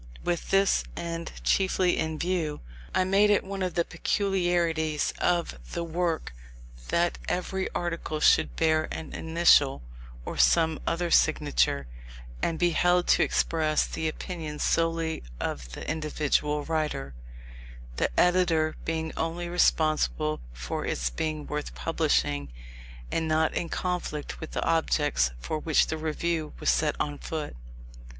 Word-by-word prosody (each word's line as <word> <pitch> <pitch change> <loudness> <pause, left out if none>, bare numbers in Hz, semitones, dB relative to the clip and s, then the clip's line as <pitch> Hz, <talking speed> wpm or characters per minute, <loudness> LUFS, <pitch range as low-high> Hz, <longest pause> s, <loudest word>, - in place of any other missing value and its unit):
With 175 -1 -2
this 195 0 +3
end 170 -1 -4
chiefly 185 -2 +2
in 160 0 -1
view, 170 -3 -1 0.3
I 185 - +4
made 195 +3 +4
it 205 - +3
one 195 0 -5
of 185 -2 -2
the 170 -1 +2
peculiarities 175 -6 0
of 170 - 0
the 170 - -2
work 170 - -2 0.5
that 170 0 +1
every 190 +1 -2
article 170 -3 -2
should - - +4
bear 155 -1 +2
an 160 - -6
initial, 160 - +3 0.4
or - - -5
some 160 -2 +4
other 170 0 0
signature, 65 +3 +3 0.6
and 165 - 0
be 175 +1 +2
held 175 +1 +3
to - - +5
express 155 -2 +2
the 160 - -3
opinions 155 -2 -5
solely 165 -1 0 0.2
of 60 -3 -4
the - - -7
individual 150 -1 0
writer; 155 - -2 0.8
the - - +1
editor 175 -3 +3
being 160 0 -2
only 170 +2 -2
responsible 155 - +2
for - - -4
its - - -1
being 155 - -3
worth 150 - -4
publishing 70 +3 0 0.6
and 160 -1 0
not 155 0 +2
in 170 - -2
conflict 180 -5 -3
with 160 - -8
the - - -1
objects 150 - +2
for 155 - -3
which 155 0 +3
the 160 - -3
Review 160 0 -2
was - - +3
set 150 -2 +1
on 145 -1 -2
foot. 155 - -5
160 Hz, 135 wpm, -27 LUFS, 150-175 Hz, 0.8 s, to